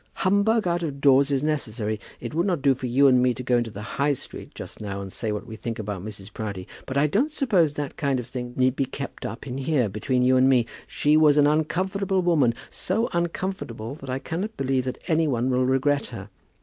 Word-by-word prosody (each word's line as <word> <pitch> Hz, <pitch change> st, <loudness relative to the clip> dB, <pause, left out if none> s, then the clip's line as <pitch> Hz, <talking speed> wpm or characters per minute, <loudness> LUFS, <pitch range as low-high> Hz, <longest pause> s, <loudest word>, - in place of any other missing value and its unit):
Humbug 200 Hz, +2 st, +3 dB
out 175 Hz, 0 st, 0 dB
of 145 Hz, -4 st, -4 dB
doors 140 Hz, 0 st, +5 dB
is 140 Hz, -1 st, 0 dB
necessary. 110 Hz, -8 st, -1 dB, 0.2 s
It 120 Hz, -, -6 dB
would 170 Hz, +5 st, +1 dB
not 175 Hz, -7 st, 0 dB
do 140 Hz, -2 st, +5 dB
for 130 Hz, 0 st, -5 dB
you 130 Hz, +4 st, +4 dB
and 130 Hz, -2 st, +6 dB
me 125 Hz, -1 st, +2 dB
to 125 Hz, -, -6 dB
go 125 Hz, -1 st, +3 dB
into 120 Hz, -1 st, -2 dB
the 105 Hz, -1 st, -8 dB, 0.2 s
High 145 Hz, +1 st, +3 dB
Street 130 Hz, -, -8 dB
just -, -, -8 dB
now 100 Hz, -2 st, -4 dB
and 95 Hz, -1 st, -7 dB
say 110 Hz, -3 st, -2 dB
what 105 Hz, -, -4 dB
we 110 Hz, -, -8 dB
think 115 Hz, +1 st, -5 dB
about 105 Hz, -4 st, -4 dB
Mrs. 105 Hz, -1 st, -9 dB
Proudie; 100 Hz, -4 st, -5 dB, 0.2 s
but 135 Hz, -, -2 dB
I 140 Hz, -, +4 dB
don't 210 Hz, -, +2 dB
suppose 200 Hz, -, +2 dB
that 145 Hz, -2 st, -4 dB
kind 140 Hz, -3 st, 0 dB
of 125 Hz, -, -5 dB
thing 125 Hz, 0 st, -6 dB
need 130 Hz, 0 st, +3 dB
be 135 Hz, -, +1 dB
kept 140 Hz, +1 st, -6 dB
up 115 Hz, -, -8 dB
in 130 Hz, 0 st, -4 dB
here, 135 Hz, -5 st, +1 dB
between 125 Hz, +5 st, 0 dB
you 130 Hz, +1 st, +4 dB
and 130 Hz, +1 st, +5 dB
me. 125 Hz, -3 st, +4 dB, 0.2 s
She 150 Hz, +1 st, +2 dB
was 150 Hz, -2 st, +5 dB
an 145 Hz, -, +6 dB
uncomfortable 185 Hz, +6 st, +1 dB
woman, 145 Hz, -9 st, +3 dB, 0.2 s
so 220 Hz, +6 st, 0 dB
uncomfortable 170 Hz, -, -3 dB
that 140 Hz, -2 st, -10 dB
I 130 Hz, -, -1 dB
cannot 185 Hz, +10 st, -4 dB
believe 130 Hz, -1 st, 0 dB
that 130 Hz, -, -3 dB
any 160 Hz, -1 st, +2 dB
one 125 Hz, -1 st, 0 dB
will 125 Hz, 0 st, +2 dB
regret 140 Hz, +2 st, +2 dB
her. 105 Hz, -4 st, -8 dB
135 Hz, 235 wpm, -25 LUFS, 120-155 Hz, 0.2 s, and